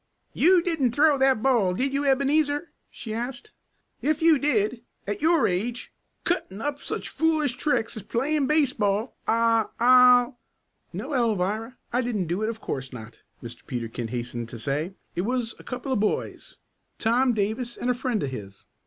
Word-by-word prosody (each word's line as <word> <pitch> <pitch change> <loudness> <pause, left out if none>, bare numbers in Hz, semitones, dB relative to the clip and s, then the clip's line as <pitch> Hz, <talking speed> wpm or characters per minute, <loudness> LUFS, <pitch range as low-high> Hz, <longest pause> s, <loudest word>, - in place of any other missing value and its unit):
"You 355 +1 +4
didn't 300 -9 0
throw 295 -1 +4
that 265 -4 +3
ball, 225 -9 +3
did 270 +6 0
you, 280 +1 0
Ebenezer?" 290 +3 +1 0.2
she 220 - -7
asked. 245 - -5 0.5
"If 305 0 +1
you 320 -3 +5
did 235 -5 +1 0.2
at 205 +4 -4
your 320 -5 +4
age 230 +7 -3 0.3
cutting 215 - -2
up 285 +3 -3
such - - -4
foolish 310 -5 0
tricks 270 -7 -1
as 220 - -6
playing 275 +7 0
baseball 250 -7 +1
I 230 -1 +3
I'll 250 0 +6 0.3
" - - -47
"No, - - -6
Alvirah, 225 -1 0 0.2
I 250 - +2
didn't 225 -7 -1
do 175 +5 -2
it, 215 - 0
of 225 -1 -5
course 135 -8 -5
not," 115 -2 -11 0.2
Mr. 120 0 -9
Peterkin 115 -1 -4
hastened 120 0 -5
to 120 - -8
say. 145 - -2 0.2
"It 175 - 0
was 235 +2 -2
a - - -12
couple 255 +1 -4
of 250 - +1
boys. 210 0 -2 0.4
Tom 245 +3 +2
Davis 220 +3 -2
and 250 - 0
a - - +2
friend 245 -3 -2
of 135 - -3
his. 100 -5 -9
240 Hz, 170 wpm, -25 LUFS, 200-275 Hz, 0.5 s, I'll